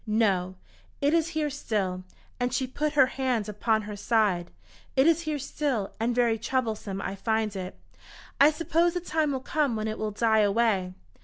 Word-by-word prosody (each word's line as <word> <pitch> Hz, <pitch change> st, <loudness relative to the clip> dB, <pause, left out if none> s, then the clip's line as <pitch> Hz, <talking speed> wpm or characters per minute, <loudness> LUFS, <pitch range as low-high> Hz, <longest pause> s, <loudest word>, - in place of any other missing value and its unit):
No, 195 Hz, -4 st, +1 dB, 0.4 s
it 285 Hz, +2 st, +2 dB
is 330 Hz, -1 st, +3 dB
here 300 Hz, -2 st, 0 dB
still," 200 Hz, -9 st, -2 dB, 0.4 s
and 245 Hz, 0 st, 0 dB
she 260 Hz, +1 st, 0 dB
put 295 Hz, +4 st, -2 dB
her 280 Hz, -3 st, +6 dB
hand 255 Hz, -5 st, -1 dB
upon 215 Hz, +1 st, 0 dB
her 210 Hz, 0 st, -6 dB
side. 205 Hz, -5 st, +1 dB, 0.5 s
"It 265 Hz, +1 st, +4 dB
is 330 Hz, 0 st, +4 dB
here 300 Hz, -, -1 dB
still, 275 Hz, -6 st, -2 dB
and 235 Hz, +2 st, 0 dB
very 235 Hz, -2 st, +2 dB
troublesome 220 Hz, -5 st, -2 dB
I 190 Hz, -, -3 dB
find 220 Hz, +1 st, -1 dB
it. 185 Hz, -, -6 dB, 0.6 s
I 285 Hz, +2 st, +8 dB
suppose 330 Hz, +2 st, +1 dB
the -, -, +1 dB
time 315 Hz, -3 st, 0 dB
will 265 Hz, -2 st, -2 dB
come 285 Hz, -3 st, 0 dB
when 215 Hz, 0 st, -2 dB
it 215 Hz, -, -4 dB
will 215 Hz, -, -1 dB
die 220 Hz, +1 st, +2 dB
away. 200 Hz, -3 st, +2 dB
230 Hz, 180 wpm, -27 LUFS, 210-280 Hz, 0.6 s, I